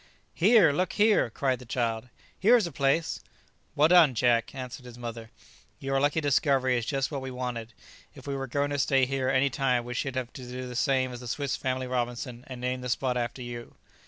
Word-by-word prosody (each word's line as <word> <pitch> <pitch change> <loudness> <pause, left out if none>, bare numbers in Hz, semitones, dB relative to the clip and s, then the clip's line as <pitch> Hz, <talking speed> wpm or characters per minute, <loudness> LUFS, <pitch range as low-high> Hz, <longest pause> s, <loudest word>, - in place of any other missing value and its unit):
"Here, 205 -4 +5
look 180 +5 -1
here!" 210 - +3
cried 130 +2 -1
the 125 - -11
child; 115 0 -2 0.3
"here's 225 +1 +5
a 170 - -5
place!" 140 +4 0 0.6
"Well 150 +2 +5
done, 165 -7 +6
Jack!" 115 0 +2
answered 130 0 -7
his 120 -1 -11
mother; 115 -1 -7 0.5
"your 135 0 -1
lucky 145 +3 +2
discovery 135 -3 +2
is 120 -1 -2
just 135 0 -1
what 140 -2 -3
we 130 - -5
wanted. 125 -3 -5 0.4
If - - -13
we 140 - -3
were 135 0 -4
going 140 +3 -1
to 145 - -1
stay 135 -1 +3
here 130 0 -1
any 135 +1 +2
time 125 -4 0
we 125 - -5
should 135 +1 -3
have 125 -2 -3
to - - -9
do 125 +1 -6
the 125 - -7
same 130 -1 +1
as 120 - -7
the 125 - -9
Swiss 140 +3 -2
Family 130 0 -2
Robinson, 125 0 -3
and 130 -2 -8
name 125 +1 -2
the 125 - -5
spot 125 +1 0
after 120 +1 -3
you!" 120 -1 -8
130 Hz, 215 wpm, -28 LUFS, 125-140 Hz, 0.6 s, done